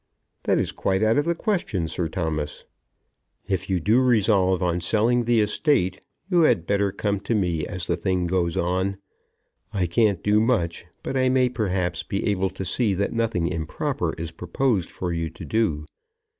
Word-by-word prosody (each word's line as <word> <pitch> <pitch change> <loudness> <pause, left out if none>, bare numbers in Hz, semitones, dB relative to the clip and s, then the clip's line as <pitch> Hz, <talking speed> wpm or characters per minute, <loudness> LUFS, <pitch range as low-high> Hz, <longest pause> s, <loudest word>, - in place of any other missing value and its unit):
"That - - +3
is - - 0
quite 95 +2 0
out 110 +5 +3
of 145 - 0
the 170 0 +1
question, 170 - -1
Sir 80 +1 -3
Thomas." 80 -4 -3 0.8
"If 95 -1 -2
you 95 -2 +1
do 110 +9 +3
resolve 100 -7 +3
on 90 0 0
selling 115 +6 +2
the 120 -1 +3
estate, 105 - +1 0.3
you 180 -3 +2
had 120 - +3
better 100 0 +1
come 100 +1 -1
to 105 +4 -1
me 85 -6 0
as 90 -1 -3
the - - 0
thing 95 -2 0
goes 85 -1 0
on. 95 +3 0 0.7
I 95 -3 0
can't 100 +2 +2
do 105 +1 +3
much, 95 -9 0 0.2
but - - -3
I 130 -1 +3
may 130 -1 +3
perhaps 95 -7 -1
be 100 - -3
able 95 -2 +1
to 95 0 -6
see 100 +3 0
that 100 +2 -1
nothing 115 -7 0
improper 80 -3 -2
is 85 0 -5
proposed 90 +4 -1
for 90 -2 -4
you 85 -1 -2
to 80 - -10
do. 85 -10 0
95 Hz, 180 wpm, -24 LUFS, 85-115 Hz, 0.8 s, That